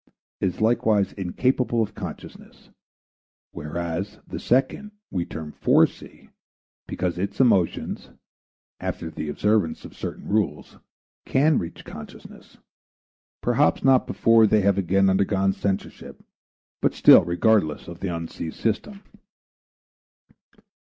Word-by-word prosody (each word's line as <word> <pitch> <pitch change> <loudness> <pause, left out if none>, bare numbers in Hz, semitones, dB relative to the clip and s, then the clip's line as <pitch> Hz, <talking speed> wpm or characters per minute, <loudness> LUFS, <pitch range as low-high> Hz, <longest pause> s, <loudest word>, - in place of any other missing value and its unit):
is 95 -2 -2
likewise 110 -3 +2
incapable 120 +5 0
of 105 - -6
consciousness, - - -10 0.8
whereas 85 +6 -5
the - - -7
second 135 +11 0 0.2
we 90 -3 -1
term 80 -1 -7
"Forec." - - 0 0.6
because 90 -1 -3
its 100 +2 -4
emotions, 105 -9 +1 0.7
after 80 - -4
the 75 -1 -5
observance 95 +1 0
of - - -12
certain - - -7
rules, 100 -8 -2 0.5
can 145 +2 +3
reach 85 - -7
consciousness, - - -12 0.8
perhaps - - +2
not 135 -1 +4
before 115 -1 +4
they 105 0 +3
have 100 0 +2
again 95 +1 +2
undergone 95 0 +2
censorship, 95 0 -4 0.6
but - - +1
still - - +8
regardless 85 -2 +1
of 85 0 -9
the 95 - -3
Unc. 85 -1 -5
system. 115 - -4
100 Hz, 110 wpm, -24 LUFS, 85-110 Hz, 0.8 s, still